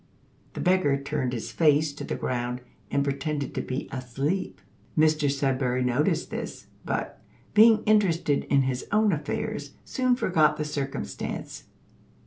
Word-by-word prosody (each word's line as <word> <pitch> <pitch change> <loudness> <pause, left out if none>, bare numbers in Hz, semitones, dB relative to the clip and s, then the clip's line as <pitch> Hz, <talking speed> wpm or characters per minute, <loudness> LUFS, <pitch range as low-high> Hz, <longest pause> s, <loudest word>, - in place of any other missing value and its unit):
The - - -6
beggar 180 -7 +3
turned 140 -2 -2
his 120 -3 -4
face 150 -2 +3
to 145 - -7
the - - -3
ground, 125 0 -2 0.3
and 140 - +1
pretended 140 0 -2
to - - -2
be 130 +2 -4
asleep. 135 +8 -2 0.4
Mr 155 -2 +3
Sudberry 130 -2 0
noticed 150 +7 +1
this; - - -5 0.2
but, - - -3 0.3
being 220 0 +7
interested 185 -9 +2
in 140 -1 +3
his 130 -1 -2
own 215 0 +4
affairs, 145 -1 -3
soon 255 -1 +1
forgot 165 -10 +2
the 150 - -2
circumstance. 140 - -5
145 Hz, 135 wpm, -26 LUFS, 135-165 Hz, 0.4 s, being